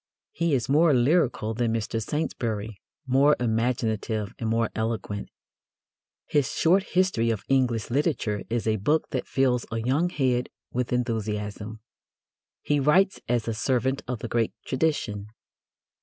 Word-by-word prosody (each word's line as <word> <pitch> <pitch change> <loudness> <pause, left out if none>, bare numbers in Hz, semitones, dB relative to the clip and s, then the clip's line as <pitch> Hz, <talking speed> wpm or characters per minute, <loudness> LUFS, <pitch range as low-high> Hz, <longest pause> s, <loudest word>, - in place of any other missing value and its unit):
He 170 -4 +1
is 125 - -1
more 150 +1 +4
lyrical 125 -4 +2
than 115 0 0
Mr. 115 0 -2
Saintsbury, 110 -6 -3 0.2
more 135 +3 +4
imaginative 110 -3 -1
and 115 - -2
more 115 0 +1
eloquent. 110 -2 -3 1.0
His 145 -3 +1
short 180 +4 +4
history 185 -12 +1
of 110 -3 -1
English 125 -4 +1
literature 130 - 0
is 115 0 -1
a 110 -1 +2
book 150 +11 +1
that 130 - -2
fills 125 -2 +1
a 115 - -2
young 135 +10 +1
head 130 -6 0 0.2
with 125 0 -2
enthusiasm. 110 -3 -2 0.8
He 145 -1 +1
writes 185 +8 +3
as 120 -2 +1
a 115 - 0
servant 130 +3 0
of 125 -1 -2
the 120 - -3
great 115 0 0
tradition. 130 -8 -1
120 Hz, 140 wpm, -26 LUFS, 110-140 Hz, 1.0 s, more